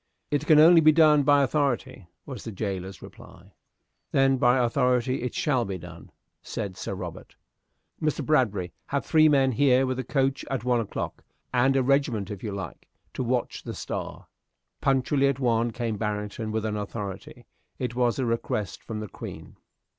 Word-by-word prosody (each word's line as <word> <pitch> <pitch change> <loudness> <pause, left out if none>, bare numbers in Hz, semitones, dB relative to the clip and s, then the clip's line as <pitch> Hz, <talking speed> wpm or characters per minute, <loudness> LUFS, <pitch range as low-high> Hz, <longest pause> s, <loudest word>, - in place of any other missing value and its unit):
"It 145 - -1
can 155 - +6
only 165 +2 +8
be 155 0 +7
done 155 -2 +5
by 145 0 +4
authority," 130 - -1 0.2
was 130 -7 -8
the 115 - -6
jailer's 95 -2 -5
reply. - - -14 0.6
"Then 135 0 +3
by 125 0 +4
authority 125 +1 +1
it 125 - -4
shall 150 -9 +1
be 95 -3 -4
done," 85 - -12 0.3
said 95 -3 -5
Sir - - -5
Robert - - -8 0.7
"Mr. 155 -2 -1
Bradbury, 105 - +1
have 140 0 -2
three 155 -1 +5
men 135 -2 +3
here 130 +1 +3
with 130 0 -2
a - - -2
coach 135 +1 0
at 135 -4 -2
one 125 -1 +2
o'clock, 110 - -5 0.3
and 130 +2 +3
a 135 - +3
regiment, 125 -7 +1
if 100 - -7
you 105 - -4
like, 100 -1 -7 0.3
to - - -3
watch 125 0 -1
the - - -7
'Star.'" - - -6 0.6
Punctually 135 +1 +2
at 140 -1 0
one 120 -2 +1
came 115 -2 -3
Barrington 105 +1 -3
with 110 0 -2
an 105 -1 -2
authority. 100 -2 -6 0.3
It 125 -2 -3
was 120 -1 +1
a 130 - 0
request 115 -3 -2
from 110 -2 -6
the 105 - -5
Queen. - - -9
125 Hz, 175 wpm, -26 LUFS, 110-135 Hz, 0.7 s, only